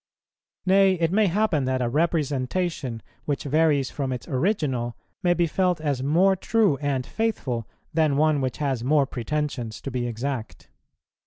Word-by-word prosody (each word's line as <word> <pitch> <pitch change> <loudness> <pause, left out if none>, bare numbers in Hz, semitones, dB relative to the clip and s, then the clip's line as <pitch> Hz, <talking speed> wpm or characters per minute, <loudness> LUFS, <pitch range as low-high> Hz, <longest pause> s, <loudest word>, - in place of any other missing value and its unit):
Nay, 190 0 +5
it 165 -2 0
may 210 +1 +3
happen 180 -6 +1
that 130 0 0
a 125 - 0
representation 145 -2 -1 0.2
which 145 -2 -2
varies 145 -2 +2
from 135 -3 -3
its 125 -3 -5
original 130 - -1 0.2
may 175 -2 +3
be 175 0 +2
felt 180 +1 +1
as 145 -4 -1
more 175 +8 +3
true 205 -5 +2
and 140 -3 -1
faithful 135 - -2 0.3
than 155 -3 +2
one 155 -1 +3
which 130 -3 -2
has 135 -5 -1
more 145 +2 +3
pretensions 130 -3 -3
to 135 - -5
be 120 -1 -2
exact. 120 0 -5
145 Hz, 155 wpm, -25 LUFS, 130-170 Hz, 0.3 s, Nay